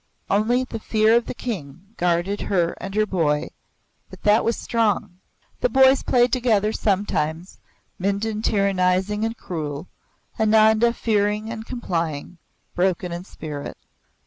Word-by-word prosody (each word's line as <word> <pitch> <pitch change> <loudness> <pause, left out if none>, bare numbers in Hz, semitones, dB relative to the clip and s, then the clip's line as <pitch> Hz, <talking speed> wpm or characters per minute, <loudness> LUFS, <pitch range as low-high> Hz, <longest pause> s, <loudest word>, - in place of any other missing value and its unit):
Only 230 +5 +2
the 230 -3 -6
fear 220 +1 +3
of 235 - +1
the - - -5
King 190 - -7
guarded 175 +3 0
her 175 -4 0
and 195 +1 -6
her 215 0 +3
boy, 155 -7 0 0.6
but - - -14
that 210 +2 +4
was 230 - 0
strong. 210 -5 -1 0.4
The - - +1
boys 265 - +5
played 245 0 +2
together 220 -5 +2
sometimes, 185 -5 -1 0.4
Mindon 200 +3 -1
tyrannizing 195 0 +1
and 225 +1 -2
cruel, 155 -1 -5 0.5
Ananda 220 +1 +4
fearing 210 -1 0
and 225 -1 -7
complying, 170 - -3 0.3
broken 180 -1 0
in 175 +1 -6
spirit. 150 -6 -7
205 Hz, 130 wpm, -23 LUFS, 180-225 Hz, 0.6 s, boys